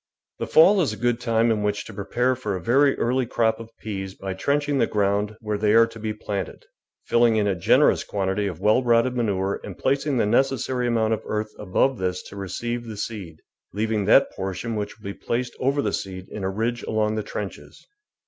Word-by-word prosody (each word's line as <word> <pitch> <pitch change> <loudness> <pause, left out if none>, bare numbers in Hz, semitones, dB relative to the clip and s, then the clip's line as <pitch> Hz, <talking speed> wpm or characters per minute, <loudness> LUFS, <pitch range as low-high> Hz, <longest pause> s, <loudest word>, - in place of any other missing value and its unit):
The - - -3
fall 190 +5 +6
is 155 - 0
a - - -8
good 120 -1 0
time 115 -1 +2
in 110 -2 0
which 105 0 -1
to 110 - -10
prepare 120 +6 0
for 105 -6 -3
a - - -3
very 135 - +3
early 125 +1 0
crop 110 -1 +1
of 115 -1 -9
peas 95 -3 -5
by 95 -1 -5
trenching 145 +7 0
the - - +3
ground 105 +1 0
where 105 -2 -2
they 105 +1 +3
are 115 0 +7
to 115 0 -11
be 110 0 -3
planted, 100 -2 -5 0.4
filling 120 -1 +3
in 105 -1 +2
a 100 - +2
generous 85 - +3
quantity 100 0 -1
of 90 -5 -5
w^ell 105 +7 +3
rotted 120 +1 +3
manure 100 -5 -1
and 95 - -8
placing 140 0 0
the 115 - +2
necessary 130 +1 +1
amount 115 -2 +1
of 110 - -2
earth 110 0 -2
above 105 +5 +1
this 90 -1 -2
to - - -11
receive 120 +5 -4
the 110 -2 -7
seed, 100 -7 -6 0.3
leaving 105 0 0
that 120 +6 +5
portion 95 +4 -4
which 105 -1 -4
will 110 - -23
be 100 - -4
placed 120 +4 -3
over 140 +2 +1
the 105 - -1
seed 95 -1 -5
in 105 - -6
a 95 - 0
ridge 115 +4 -2
along 110 -1 0
the 110 - -1
trenches. 80 -9 -7
110 Hz, 215 wpm, -24 LUFS, 100-120 Hz, 0.4 s, are